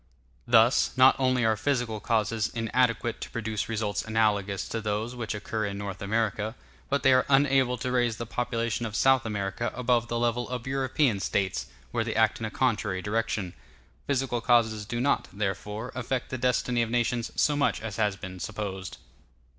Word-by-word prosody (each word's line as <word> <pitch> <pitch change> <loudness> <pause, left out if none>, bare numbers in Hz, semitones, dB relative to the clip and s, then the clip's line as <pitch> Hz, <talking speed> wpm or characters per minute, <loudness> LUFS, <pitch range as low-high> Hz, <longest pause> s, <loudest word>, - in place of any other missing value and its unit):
Thus, 120 +2 +4
not 130 +1 +7
only 130 -2 +2
are 110 -1 +3
physical 115 -1 -1
causes 110 0 0
inadequate 115 0 0
to - - -5
produce 110 -2 -3
results 105 -2 -1
analogous 105 -3 0
to 115 - -3
those 110 +3 -2
which 115 -3 -3
occur 110 0 -3
in 100 0 -5
North 100 -2 -6
America, 110 +1 -1 0.3
but 140 -1 0
they 135 - +6
are 130 - +3
unable 135 -2 +3
to 125 +2 -3
raise 120 -3 +1
the 115 - -4
population 115 -1 -2
of 105 - -7
South 130 -2 +4
America 105 +2 -2
above 120 -2 +1
the 120 - -2
level 120 0 0
of 125 -2 -4
European 130 -3 +1
States, 95 -1 -1 0.2
where 115 -2 0
they 115 - -3
act 110 0 +3
in 110 - -3
a - - -5
contrary 105 -6 0
direction. 105 -3 -1 0.5
Physical 130 -3 0
causes 110 -3 +2
do 120 +2 -3
not, 140 +4 +1
therefore, 105 +3 -3
affect 130 0 -3
the 130 - -2
destiny 125 -1 +1
of 115 - -1
nations 120 0 0
so 150 - +2
much 140 -4 +1
as 110 -2 -6
has 105 -3 +1
been 95 -2 -8
supposed. 95 -2 -5
115 Hz, 180 wpm, -27 LUFS, 105-125 Hz, 0.5 s, not